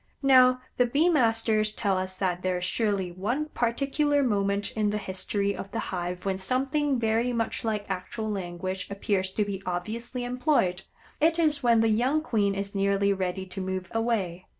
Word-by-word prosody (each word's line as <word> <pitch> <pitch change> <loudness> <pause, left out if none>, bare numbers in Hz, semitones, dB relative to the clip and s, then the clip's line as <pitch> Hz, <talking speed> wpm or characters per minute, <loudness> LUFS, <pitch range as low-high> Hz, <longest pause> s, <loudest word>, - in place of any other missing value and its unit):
Now, 255 -2 +6 0.2
the 245 - +4
bee 295 +8 +3
masters 225 -7 +2
tell 200 -2 0
us 185 0 -2
that 180 -2 -1
there 185 -1 0
is 180 - -3
surely 200 -3 0
one 240 - -2
particular 280 +4 +1
moment 200 -3 0
in 215 -1 0
the 210 - -1
history 200 +1 -2
of 195 - -7
the 230 - -5 0.2
hive 180 0 -4
when 190 -1 -1
something 270 +6 0
very 225 +2 +1
much 230 -1 -2
like 215 -2 -2
actual 195 +4 -4
language 185 -1 -4
appears 200 -1 -1
to 210 - +1
be 200 -1 -4
obviously 220 +8 -4
employed. 245 - +1 0.4
It 320 +2 +3
is 305 -4 +2
when 235 -3 +4
the 225 - +3
young 255 +8 +2
queen 205 -8 +1
is 200 0 -4
nearly 200 0 +2
ready 190 0 -3
to 190 +1 -6
move 185 -1 -4
away. 215 -6 -1
210 Hz, 175 wpm, -27 LUFS, 190-245 Hz, 0.4 s, Now